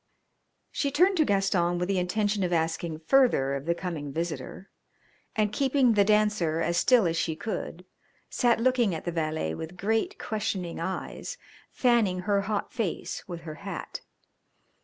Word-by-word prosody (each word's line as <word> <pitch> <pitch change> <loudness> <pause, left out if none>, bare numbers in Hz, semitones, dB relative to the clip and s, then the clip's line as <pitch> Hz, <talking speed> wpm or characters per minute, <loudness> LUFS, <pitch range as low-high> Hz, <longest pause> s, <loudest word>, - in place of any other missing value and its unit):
She 280 - 0
turned 360 +8 +3
to 310 - +4
Gaston 190 -4 +1
with 180 0 -1
the 195 -1 +1
intention 205 +3 0
of 180 - -1
asking 160 -1 -1
further 200 - +3
of 140 +2 -4
the 170 - +2
coming 165 -6 -5
visitor, 165 +3 -5 0.6
and, 210 -1 +1
keeping 265 -1 +3
The 205 -1 +5
Dancer 210 -6 +2
as 170 +1 0
still 230 +4 +5
as 165 -1 +1
she 165 -1 -1
could, 180 -2 -5 0.4
sat 240 -3 +2
looking 240 -6 +2
at 160 - -7
the 175 - -1
valet 155 - -2
with 160 - -7
great, 225 - 0
questioning 195 -5 -3
eyes, 190 - -4 0.3
fanning 225 -8 +2
her 200 +1 +1
hot 205 +1 -3
face 215 -8 -3
with 175 -2 -6
her 160 -2 -7
hat. - - -6
190 Hz, 160 wpm, -27 LUFS, 165-220 Hz, 0.6 s, The